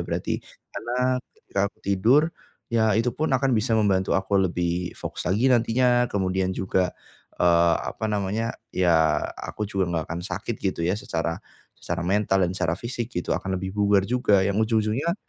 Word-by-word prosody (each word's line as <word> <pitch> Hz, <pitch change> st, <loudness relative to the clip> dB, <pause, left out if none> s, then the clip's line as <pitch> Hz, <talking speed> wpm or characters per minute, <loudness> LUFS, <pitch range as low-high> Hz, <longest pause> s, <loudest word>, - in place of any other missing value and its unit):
berarti. -, -, -2 dB, 0.3 s
Karena, 125 Hz, +1 st, -1 dB, 0.2 s
ketika 100 Hz, -, -4 dB
aku -, -, -31 dB
tidur, 110 Hz, +9 st, +4 dB, 0.5 s
ya, 110 Hz, -2 st, +3 dB
itu 115 Hz, +2 st, +2 dB
pun 155 Hz, -, -1 dB
akan 135 Hz, +1 st, +2 dB
bisa 110 Hz, 0 st, +2 dB
membantu 95 Hz, -3 st, +2 dB
aku 95 Hz, +1 st, +1 dB
lebih 85 Hz, 0 st, -2 dB
fokus -, -, -5 dB
lagi 115 Hz, +8 st, +3 dB
nantinya. 120 Hz, +1 st, +3 dB
Kemudian 95 Hz, -3 st, 0 dB
juga, 95 Hz, -1 st, 0 dB, 0.4 s
eee, 85 Hz, -1 st, +4 dB, 0.2 s
apa 110 Hz, -, -3 dB
namanya, 105 Hz, +2 st, -1 dB, 0.2 s
ya, 80 Hz, -4 st, +3 dB, 0.2 s
aku 105 Hz, -1 st, -5 dB
juga 95 Hz, -2 st, 0 dB
enggak 80 Hz, -2 st, -1 dB
akan 85 Hz, +1 st, -4 dB
sakit, 115 Hz, +1 st, -4 dB
gitu, 95 Hz, -3 st, -2 dB
ya, 90 Hz, +4 st, +1 dB
secara 85 Hz, -5 st, -2 dB, 0.4 s
secara 85 Hz, 0 st, -3 dB
mental 95 Hz, +1 st, +1 dB
dan 90 Hz, -, +1 dB
secara 85 Hz, -3 st, 0 dB
fisik, 120 Hz, +3 st, -4 dB
gitu, 90 Hz, -, -3 dB
akan 95 Hz, 0 st, -3 dB
lebih 95 Hz, 0 st, -4 dB
bugar 100 Hz, -1 st, +4 dB
juga. 105 Hz, -3 st, +2 dB
Yang 100 Hz, +3 st, +1 dB
ujung-ujungnya 110 Hz, +8 st, 0 dB
100 Hz, 165 wpm, -25 LUFS, 90-115 Hz, 0.5 s, tidur